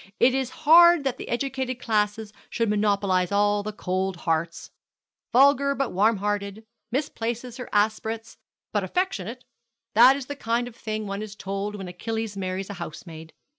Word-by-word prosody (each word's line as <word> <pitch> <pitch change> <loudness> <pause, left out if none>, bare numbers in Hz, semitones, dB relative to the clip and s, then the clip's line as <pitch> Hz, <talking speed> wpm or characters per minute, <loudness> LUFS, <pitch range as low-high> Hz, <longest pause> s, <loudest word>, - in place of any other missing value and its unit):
It 245 +2 +5
is 265 -1 -1 0.2
hard 340 0 +8
that 265 -2 -1
the - - -8
educated 260 0 -2
classes 210 -2 -1 0.2
should 230 -3 0
monopolize 200 -3 +1
all 205 0 +2
the 210 +1 -5
cold 190 -2 -2
hearts. 165 0 -1 0.6
Vulgar 280 +2 +4
but 275 -2 -1
warm 210 +4 +3
hearted 205 +1 -3 0.3
misplaces 240 -3 -3
her 250 - -7
aspirates 220 +2 -1 0.3
but 205 -2 +1
affectionate! 245 - -3 0.5
That 245 +5 +7
is 275 -2 -5
the 285 - -6
kind 235 -2 -1
of 240 - -11
thing 215 -2 -4
one 200 0 -4
is 215 -1 -7
told 200 +1 -4
when 195 -2 -7
Achilles 220 +4 -4
marries 190 0 -4
a 190 -3 -8
housemaid. 160 -1 -9
215 Hz, 160 wpm, -25 LUFS, 200-245 Hz, 0.6 s, hard